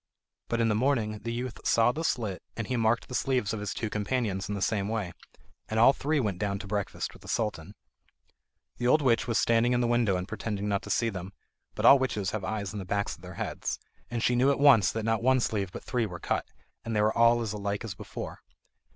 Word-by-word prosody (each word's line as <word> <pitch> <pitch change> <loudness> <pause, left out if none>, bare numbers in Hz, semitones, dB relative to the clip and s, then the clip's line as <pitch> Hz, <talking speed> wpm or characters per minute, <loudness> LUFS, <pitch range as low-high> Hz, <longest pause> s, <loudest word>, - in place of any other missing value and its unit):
But 115 - -1
in 115 - +3
the 110 - +2
morning 110 -3 +1
the 115 +3 -4
youth 120 +1 -4
saw 115 +1 +4
the 160 +5 -4
slit, 110 - -1 0.2
and 115 - -2
he 125 - -2
marked 115 0 +1
the - - -9
sleeves 125 -3 0
of 110 - -3
his 105 -1 -3
two 115 - -3
companions 105 -2 -2
in 105 - -1
the - - -3
same 100 -3 0
way, 105 -5 -2 0.6
and 110 - 0
all 125 +4 +7
three 150 +2 0
went 100 -8 -1
down 100 -2 -1
to 100 - -8
breakfast 100 -1 -3
with - - -16
the - - -14
Sultan. 105 -4 -2 1.0
The 120 - -1
old 150 +4 +4
witch 120 -2 +2
was 115 - +1
standing 115 +1 +3
in 120 - +2
the 120 - +2
window 120 -5 +2
and 90 0 -4
pretended 105 -1 -4
not 100 -1 0
to - - -10
see 115 - +1
them; 95 -1 -7 0.4
but - - -1
all 140 - +9
witches 105 -8 -1
have 110 -3 -3
eyes 100 -1 -3
in 105 - -4
the - - -4
backs 100 +2 -2
of - - -21
their - - -10
heads, - - -3 0.3
and 120 -1 -2
she 125 - +3
knew 130 +3 +4
at 140 - +1
once 140 -7 +6
that 110 -1 -3
not 115 -1 +1
one 130 +2 +4
sleeve 100 -6 -1
but - - -8
three 120 -3 -1
were 90 -3 -7
cut, - - -1 0.4
and 115 -1 -3
they 105 - +3
were 110 - +2
all 115 +1 +5
as 110 -2 -3
alike 100 +1 -3
as 110 -4 -5
before. - - -7
110 Hz, 245 wpm, -28 LUFS, 100-120 Hz, 1.0 s, all